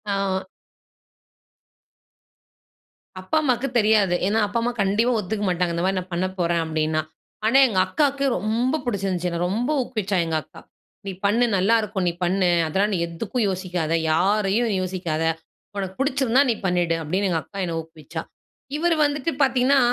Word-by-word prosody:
ஆமா. 195 -1 0 2.8
அப்பா, 185 +12 -1
அம்மாக்கு 260 -2 +1
தெரியாது. 210 -4 +3
ஏன்னா, 220 +2 +2
அப்பா 230 +3 -1
அம்மா 240 +1 0
கண்டிப்பா 210 +5 +2
ஒத்துக்க 210 +1 -3
மாட்டாங்க. 175 -1 0
இந்த 170 - -1
மாரி 190 0 +1
நான் 185 0 -9
பண்ணப்போறேன், 175 -2 0
அப்பிடின்னா. 155 0 0 0.4
ஆனா, 245 +5 +4
எங்க 195 -5 0
அக்காவுக்கு 280 -2 +1
ரொம்ப 235 +7 0
புடிச்சிருந்துச்சு, 190 -5 -1
என்ன 170 - -3
ரொம்ப 235 +8 -1
ஊக்குவிச்சா, 210 -6 -2
எங்க 160 -1 -2
அக்கா. - - -15 0.4
"நீ 195 - -3
பண்ணு 230 +4 +3
நல்லா 200 +5 +3
இருக்கும், 200 -3 -2
நீ 170 - +1
பண்ணு. 185 0 +2 0.2
அதெல்லாம் 200 +6 +1
நீ - - +1
எதுக்கும் 205 +7 -2
யோசிக்காத. 180 -4 -2 0.2
யாரையும் 205 +6 +2
யோசிக்காத. 175 -4 -2 0.5
உனக்கு 190 -1 -4
பிடிச்சிருந்தா, 270 -1 +3
நீ - - -1
பண்ணிடு." 175 -2 +1
அப்பிடின்னு 185 +5 0
எங்க 160 -2 0
அக்கா 200 - -9
என்னை 165 -1 -3
ஊக்குவிச்சா. 160 0 -8 0.6
இவரு 335 +1 +2
வந்துட்டு 290 +2 -1
பார்த்தீங்கன்னா, 265 +1 +3
195 Hz, 150 wpm, -23 LUFS, 175-235 Hz, 2.8 s, ஆனா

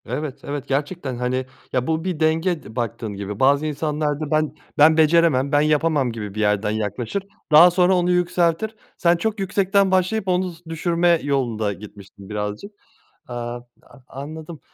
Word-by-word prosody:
Evet, 145 -2 -4
evet 140 -1 -5
gerçekten, 145 0 -2
hani, 125 +1 -1 0.3
ya, 125 -1 0
bu 160 0 0
bir 180 -4 -3
denge 160 +2 +1
d 110 - -12
baktığın 115 -3 -3
gibi. 100 +1 -6
Bazı 140 +3 +3
insanlar 150 -1 -1
da 155 -2 -5
ben 155 -1 +1 0.2
ben 155 +2 +6
beceremem, 155 -4 +4
ben 145 -1 +4
yapamam 150 -3 +2
gibi 105 -3 -7
bir - - -4
yerden 105 0 +1
yaklaşır, 110 - -3 0.3
daha 165 +4 +8
sonra 180 +1 +3
onu 180 0 +2
yükseltir. 180 +3 +1 0.2
Sen 170 0 +3
çok 220 +3 -2
yüksekten 195 0 +2
başlayıp 190 +3 +1
onu 185 0 +1
z 170 0 -14
düşürme 170 +1 +1
yolunda 120 -7 -1
gitmişsin 100 -1 -13
birazcık. 105 - -4 0.6
Aaa, 120 -1 -4 0.3
a - - -18
anladım. 155 +3 -8
150 Hz, 165 wpm, -22 LUFS, 125-175 Hz, 0.6 s, daha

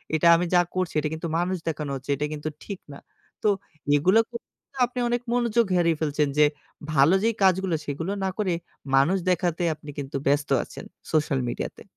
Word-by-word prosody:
এটা 160 +2 +3
আমি 175 +1 +1
যা 175 - +6
করছি 185 -2 -1
এটা 150 0 -1
কিন্তু 160 +1 -4
মানুষ 180 +2 0
দেখানো 150 -2 -4
হচ্ছে, 135 +1 -9
এটা 145 +2 -2
কিন্তু 150 +1 -4
ঠিক 200 -3 -6
না।" - - -10 0.4
তো - - +3 0.5
এগুলো 185 +9 +4
ক - - -60 0.6
আপনি 250 +1 -6
অনেক 240 0 0
মনোযোগ 235 -1 +2
হেরিয়ে 170 -3 +2
ফেলছেন 150 -1 +1
যে, 150 - +7 0.5
ভালো 145 +6 +5
যেই 230 -1 +2
কাজগুলা 190 -2 +3
সেইগুলো 160 +7 -3
না 190 - +1
করে, 190 -5 0 0.4
মানুষ 160 +8 +4
দেখাতে 175 -1 +1
আপনি 150 - -13
কিন্তু 140 0 -6
ব্যস্ত 145 +1 +2
আছেন, - - -10 0.3
সোশ্যাল 150 -3 +1
মিডিয়াতে। - - -5
170 Hz, 180 wpm, -25 LUFS, 150-190 Hz, 0.6 s, যে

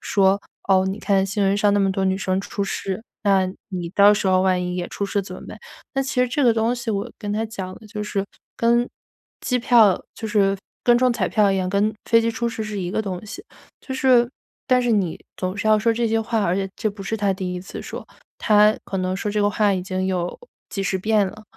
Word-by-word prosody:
说： 195 0 +2 0.3
“哦， 190 -1 +4
你 195 +2 -3
看 195 -2 +2
新 200 +2 -1
闻 195 0 +2
上 205 0 +3
那 205 - +3
么 195 -1 +2
多 190 0 -1
女 190 0 +1
生 190 0 0
出 200 0 -3
事， 195 +1 -4 0.2
那 195 -2 +3 0.2
你 180 -4 -4
到 205 +1 +7
时 205 - 0
候 185 0 +4
万 185 -1 +2
一 180 0 -3
也 180 -1 -3
出 200 - -3
事 200 0 -1
怎 185 -1 -9
么 - - -11
办？” - - -9 0.4
那 270 - +1
其 265 -1 -1
实 250 - +4
这 285 +4 0
个 240 -3 +5
东 225 +2 +1
西 240 -2 -4
我 210 +3 -3
跟 205 -2 -4
她 220 +2 -1
讲 190 -4 -6
的 220 - -14
就 210 0 -5
是， 200 -1 -2 0.3
跟 235 +1 +2 0.5
机 250 - 0
票 230 -5 +4
就 225 - -5
是 200 -2 +2 0.3
跟 240 0 +5
中 255 -1 +3
彩 - - -1
票 205 -3 +3
一 - - 0
样， 185 -1 -1
跟 205 +2 +1
飞 230 - +5
机 230 - 0
出 235 +1 -2
事 225 -1 -4
是 210 -2 -4
一 175 -1 -3
个 215 - 0
东 190 -2 -5
西。 360 - -9 0.4
就 265 - -6
是 255 -2 +4 0.4
但 255 -1 +4
是 240 -1 +1
你 190 -6 0 0.2
总 185 +1 -3
是 205 - -3
要 215 - +6
说 230 +2 +2
这 235 +1 0
些 225 0 +1
话 225 0 -1
而 170 - +1
且 195 0 -1
这 220 - 0
不 200 0 -9
是 220 +3 -2
她 200 -2 +1
第 185 -1 -4
1 180 - -4
次 190 - -8
说， - - -8 0.3
她 210 0 +4
可 195 - -4
能 185 0 -1
说 210 - -3
这 210 0 0
个 205 - +3
话 205 -1 +2
已 185 - -2
经 185 0 -2
有 180 - -2 0.3
几 195 - -4
十 195 -1 0
遍 210 0 +2
了， 215 +3 -9
205 Hz, 270 characters per minute, -22 LUFS, 190-225 Hz, 0.5 s, 到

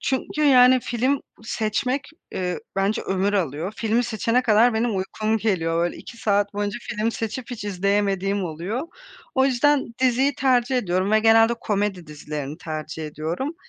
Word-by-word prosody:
çünkü, 270 +3 -2
yani, 255 -2 +6
film 255 +4 0 0.2
seçmek, 250 +5 -2 0.2
eee, 180 -1 -2 0.2
bence 195 +2 +1
ömür 195 +1 0
alıyor. 170 0 -1
Filmi 230 +2 +1
seçene 230 +2 0
kadar 230 0 +4
benim 225 -2 0
uykum 215 +3 -1
geliyor. 165 -6 0
Böyle, 175 - -3
2 235 - -11
saat 205 -2 0
boyunca 205 +2 -2
film 225 0 -2
seçip 230 +3 -5
hiç 230 -4 -6
izleyemediğim 200 0 0
oluyor. 175 - -4 0.5
O 265 - +4
yüzden 270 -1 +2
diziyi 260 +2 +2
tercih 255 -1 +2
ediyorum 185 -3 0
ve 215 - +5
genelde 225 +1 +5
komedi 205 -5 -2
dizilerini 150 0 -6
tercih 155 -1 -5
ediyorum. 165 - -4
215 Hz, 150 wpm, -23 LUFS, 190-245 Hz, 0.5 s, yani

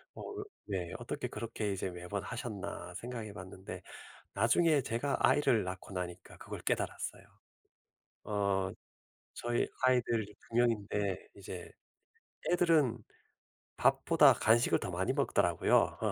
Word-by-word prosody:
어으 415 0 -6 0.2
네. 90 -4 -3
'어떻게 - - -4
그렇게 110 -3 -3
이제 95 -1 -2
매번 90 +3 -5
하셨나.' 115 -4 -5
생각해 115 -4 -5
봤는데 95 -1 -8 0.5
나중에 140 - +4
제가 120 +5 -1
아이를 120 -7 +4
낳고 95 +1 -6
나니까 90 -1 -6
그걸 - - -7
깨달았어요. - - -2 1.0
어 100 -2 +1 0.6
저희 120 0 0 0.2
아이들이 120 -4 +2
2 115 - -5
명인데 105 -5 +1
이제 95 -3 -8 0.8
애들은 160 -9 +4 0.8
밥보다 - - +6
간식을 115 +2 +4
더 - - -4
많이 - - 0
먹더라고요. - - +3
110 Hz, 265 characters per minute, -33 LUFS, 95-120 Hz, 1.0 s, 밥보다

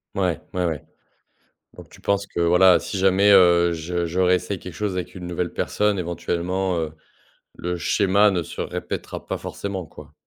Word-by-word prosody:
Ouais, 90 -5 0
ouais, 90 -1 0
ouais. 80 -5 -2 0.9
Donc - - -12
tu - - -17
penses 100 0 0
que 85 - -5
voilà, 90 +1 +6
si 100 - -5
jamais, 95 +2 +4
heu, 85 -2 +6
je 85 +1 -2
je 85 +3 -2
réessaye 90 +1 +1
quelque 90 -2 -9
chose 105 +1 -2
avec 90 0 -4
une 90 -2 -7
nouvelle 90 0 -3
personne. 105 -1 0
Éventuellement, 90 +1 -2
heu, 80 -1 -3 0.6
le 90 +1 -3
schéma 100 +4 +3
ne 90 -3 -1
se - - -6
répétera - - -5
pas - - -3
forcément, 95 -3 -5
quoi. 75 -1 -14
90 Hz, 175 wpm, -23 LUFS, 85-95 Hz, 0.9 s, voilà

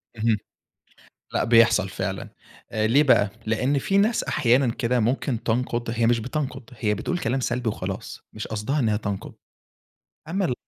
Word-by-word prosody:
اهم. 110 -1 +2 1.0
لأ، - - +2
بيحصل 115 -4 +5
فعلًا. - - -4 0.4
ليه 110 +6 +3
بقى؟ 105 -8 +4 0.2
لأن 125 +6 +1
في 195 +8 +1
ناس 220 +3 +2
أحيانًا 125 -2 +2
كده 125 -1 0
ممكن 120 +1 0
تنقُد، 120 0 -1
هي 115 0 +1
مش 115 0 +3
بتنقُد 130 0 -4
هي 105 -1 +1
بتقول 180 +9 -2
كلام 130 -4 -1
سلبي 120 -1 -1
وخلاص 105 - -5
مش 110 - -6
قصدها 110 +7 -2
إنها 110 -5 +2
تنقُد، 100 -2 -4 0.9
أمّا 190 +3 0
ال 125 - 0
120 Hz, 150 wpm, -24 LUFS, 110-135 Hz, 1.0 s, بيحصل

